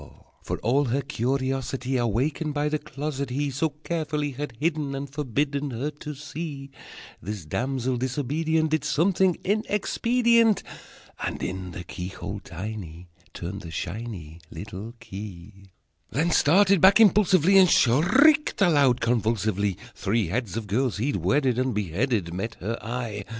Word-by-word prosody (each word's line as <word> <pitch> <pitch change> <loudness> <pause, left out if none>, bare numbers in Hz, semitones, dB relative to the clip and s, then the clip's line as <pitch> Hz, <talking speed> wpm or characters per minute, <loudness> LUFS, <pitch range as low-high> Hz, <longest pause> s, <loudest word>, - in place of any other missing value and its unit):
For, - - -3
all 135 +6 +3
her 135 +3 0
curiosity 130 0 -2
Awakened 130 +6 0
by 145 +1 +1
the 155 0 -1
closet 140 -1 -4
he 140 +3 -1
So 150 +5 0
carefully 150 -3 -2
had 135 -3 -6
hidden, 150 -3 -1
And 140 +1 -4
forbidden 140 +1 -2
Her 130 +5 -3
to 150 0 -8
see, 145 -1 -7 0.5
This 100 -3 -6
damsel 130 - -1
disobedient 150 +5 0
Did 155 -3 +1
something 180 +3 +2
inexpedient, 230 +2 +2 0.6
And - - -3
in 95 0 -4
the 90 0 -7
keyhole 95 +3 -6
tiny 90 -3 -7 0.3
Turned 95 +3 -5
the 85 - -8
shiny 90 -3 -6
Little 100 +6 -8
key: 95 0 -10 0.4
Then 165 +5 0
started 190 +4 +4
back 195 +3 +7
impulsively, 195 -3 +5
And 185 -2 +6
shrieked 255 - +4
aloud 145 - +4
convulsively 110 -4 0 0.2
Three 100 -3 0
heads 110 0 -2
of 115 - -3
girls 115 +3 0
he'd 135 +7 0
wedded 130 -3 +1
And 130 -3 0
beheaded 100 - -1
Met 110 +5 -4
her 115 +5 -4
eye! 115 -3 -4
130 Hz, 135 wpm, -25 LUFS, 110-150 Hz, 0.6 s, back